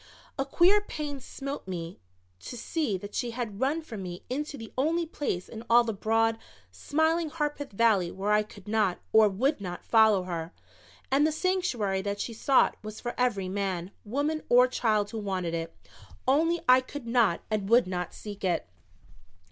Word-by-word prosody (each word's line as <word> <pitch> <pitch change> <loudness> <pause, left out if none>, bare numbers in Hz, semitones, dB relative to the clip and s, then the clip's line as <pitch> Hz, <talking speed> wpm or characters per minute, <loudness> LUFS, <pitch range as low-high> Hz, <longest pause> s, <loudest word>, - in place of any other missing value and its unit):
A 270 - +1
queer 360 +8 +4
pain 300 -8 -5
smote 275 -1 -6
me 170 -1 -5 0.4
to 245 - -8
see 250 - -1
that 205 +2 -9
she 245 - -1
had 230 -4 -5
run 290 +5 0
from 225 -10 -7
me 180 -1 -7
into 295 +2 -3
the 225 -2 -10
only 325 +6 +1
place 280 - -3
in 225 0 -8
all 240 +1 +7
the 225 -1 -2
broad, 225 +2 +1 0.3
smiling 320 +2 0
Harpeth 295 -2 -3
Valley 200 -4 +3
where 195 +3 -2
I 210 0 +5
could 210 -2 -12
not 210 -4 +1 0.2
or 220 -1 +7
would 245 +6 0
not, 175 -2 -6
follow 220 -4 +5
her. 170 -1 -5 0.6
And 285 +3 +4
the - - 0
sanctuary 310 - 0
that 200 +1 -3
she 230 - -3
sought 265 +4 +3
was 215 0 -8
for 240 - -4
every 225 -7 0
man, 190 -2 -2
woman 290 +8 -1
or 250 +1 +7
child 215 -5 0
who 225 - -4
wanted 185 -5 -2
it 165 0 -4 0.5
only 325 +5 +3
I 255 +1 +7
could 260 0 -8
not 230 -7 +2
and 205 -2 -1
would 240 +2 +6
not 180 -1 -3
seek 205 -2 -9
it. 175 - 0
225 Hz, 180 wpm, -28 LUFS, 195-280 Hz, 0.6 s, all